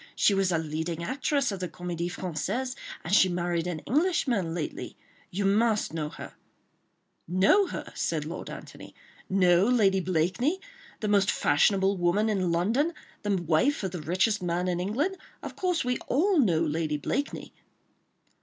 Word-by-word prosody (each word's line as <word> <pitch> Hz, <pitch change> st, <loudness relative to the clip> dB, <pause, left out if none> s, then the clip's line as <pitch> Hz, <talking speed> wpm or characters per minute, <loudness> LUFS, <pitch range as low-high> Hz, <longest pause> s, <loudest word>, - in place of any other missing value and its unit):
She 205 Hz, -, +4 dB
was 195 Hz, -1 st, +2 dB
a 170 Hz, -, +2 dB
leading 160 Hz, +2 st, -3 dB
actress 275 Hz, -, 0 dB
of 195 Hz, -, -5 dB
the 180 Hz, -1 st, -3 dB
Comédie 175 Hz, -1 st, -4 dB
Française, 190 Hz, +11 st, -3 dB, 0.3 s
and 170 Hz, -, -3 dB
she 190 Hz, -2 st, +6 dB
married 175 Hz, -1 st, -1 dB
an 165 Hz, -3 st, -4 dB
Englishman 260 Hz, -, +1 dB
lately. 160 Hz, -4 st, -5 dB, 0.3 s
You 195 Hz, +2 st, -2 dB
must 210 Hz, -1 st, +2 dB
know 155 Hz, -2 st, -2 dB
her—" -, -, -10 dB, 0.9 s
"Know 195 Hz, -, +4 dB
her?" -, -, -6 dB
said -, -, -2 dB
Lord -, -, -6 dB
Antony. -, -, -10 dB, 0.3 s
"Know 180 Hz, -2 st, +4 dB
Lady 210 Hz, -5 st, +3 dB
Blakeney—the 215 Hz, -, -2 dB
most 200 Hz, -1 st, +3 dB
fashionable 195 Hz, +6 st, +3 dB
woman 180 Hz, +5 st, +2 dB
in 185 Hz, -5 st, 0 dB
London—the 205 Hz, -, -1 dB
wife 175 Hz, -, +2 dB
of 190 Hz, -, -2 dB
the 175 Hz, -3 st, -5 dB
richest 190 Hz, +7 st, +1 dB
man 175 Hz, +1 st, -1 dB
in 175 Hz, -1 st, 0 dB
England? 275 Hz, -, -1 dB, 0.3 s
Of -, -, -7 dB
course, 360 Hz, -7 st, 0 dB
we 250 Hz, 0 st, 0 dB
all 350 Hz, +6 st, +2 dB
know 175 Hz, -, +3 dB
Lady 155 Hz, -1 st, -1 dB
Blakeney." 280 Hz, -, -3 dB
190 Hz, 150 wpm, -27 LUFS, 170-240 Hz, 0.9 s, she